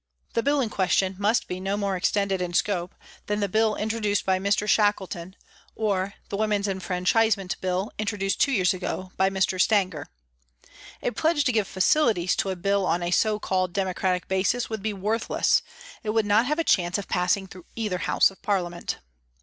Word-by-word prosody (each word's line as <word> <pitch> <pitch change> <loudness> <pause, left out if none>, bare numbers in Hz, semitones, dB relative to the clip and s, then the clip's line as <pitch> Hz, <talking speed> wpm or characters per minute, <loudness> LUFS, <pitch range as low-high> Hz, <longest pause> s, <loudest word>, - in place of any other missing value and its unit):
The 230 - +1
Bill 285 +2 +2
in 225 -4 -2
question 190 0 +1
must 210 +4 +1
be 180 - -4
no 195 +2 -2
more 200 -2 -1
extended 195 +1 0
in 175 -1 -3
scope 180 -3 0 0.3
than 210 0 -1
the 200 - 0
Bill 215 +2 +2
introduced 210 -1 -1
by 190 -1 +2
Mr. 200 +2 +1
Shackleton 190 -4 +1 0.4
or 200 -3 -1
the 200 - -3
Women's 210 -1 0
Enfranchisement 190 +1 +1
Bill 185 +2 -1
introduced 205 -2 -1
two 280 - +4
years 195 -6 +3
ago 185 0 -4
by 190 0 +3
Mr. 190 -1 +1
Stanger. 190 -9 +1 0.9
A - - 0
pledge 310 +5 +1
to 270 - +2
give 215 -4 +1
facilities 190 - +2
to 195 - 0
a 190 - -2
Bill 200 +2 0
on 170 +2 +1
316 175 - -1
a - - 0
so 215 -1 0
called 185 -3 -1
democratic 185 -1 -1
basis 195 +6 0
would 220 -2 -3
be 215 +1 -1
worthless, 210 +3 +1 0.4
it 215 - -5
would 220 0 +2
not 210 +4 +3
have 300 +2 0
a 330 - +1
chance 175 - +2
of 200 - -6
passing 190 +2 +1
through 185 -2 -13
either 210 -6 -2
House 170 - +3
of 195 - -19
Parliament. 175 -4 -2
195 Hz, 190 wpm, -25 LUFS, 185-215 Hz, 0.9 s, two